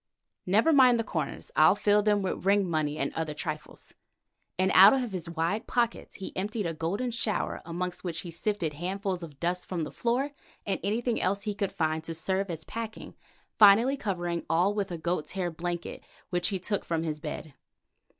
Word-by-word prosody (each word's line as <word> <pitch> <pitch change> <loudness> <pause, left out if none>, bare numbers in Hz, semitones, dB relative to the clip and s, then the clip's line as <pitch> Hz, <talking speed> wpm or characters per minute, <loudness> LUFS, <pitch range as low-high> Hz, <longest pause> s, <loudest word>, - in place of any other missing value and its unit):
Never 220 - +4
mind 255 -4 +6
the - - +1
corners, 165 -7 -4
I'll 155 +5 +6
fill 205 0 +3
them 205 -1 +2
with 190 - -3
ring 200 0 +3
money 155 -3 -1
and 140 -2 -2
other 160 -2 -3
trifles," 155 0 -6 0.6
and 185 +1 +2
out 195 +5 +9
of 255 -4 0
his 175 -3 -5
wide 170 +6 -1
pockets 235 -1 -1
he 190 - -8
emptied 210 +2 -2
a 165 - -1
golden 195 +11 -2
shower, 230 -2 -1
amongst 180 +1 -4
which 170 -3 -3
he 175 - -8
sifted 170 -2 -2
handfuls 185 +3 -3
of 150 -5 -10
dust 180 +1 -2
from 175 -3 -2
the 150 - -5
floor 250 +5 0 0.3
and 200 - -1
anything 230 +3 0
else 200 +1 0
he 210 -1 -2
could 200 -1 -2
find 160 -1 -1
to 165 - -4
serve 190 +4 -1
as 160 -2 -5
packing, 225 +4 -6 0.5
finally 220 +6 +7
covering 175 -8 -2
all 180 +5 +3
with 200 -2 -2
a 170 - -3
goat's 170 -1 -2
hair 180 -2 -2
blanket 175 +1 -5 0.3
which 175 -1 +1
he 195 - -1
took 200 +3 -2
from 165 -1 -1
his 155 -2 -3
bed. 150 0 -6
185 Hz, 190 wpm, -28 LUFS, 165-210 Hz, 0.6 s, out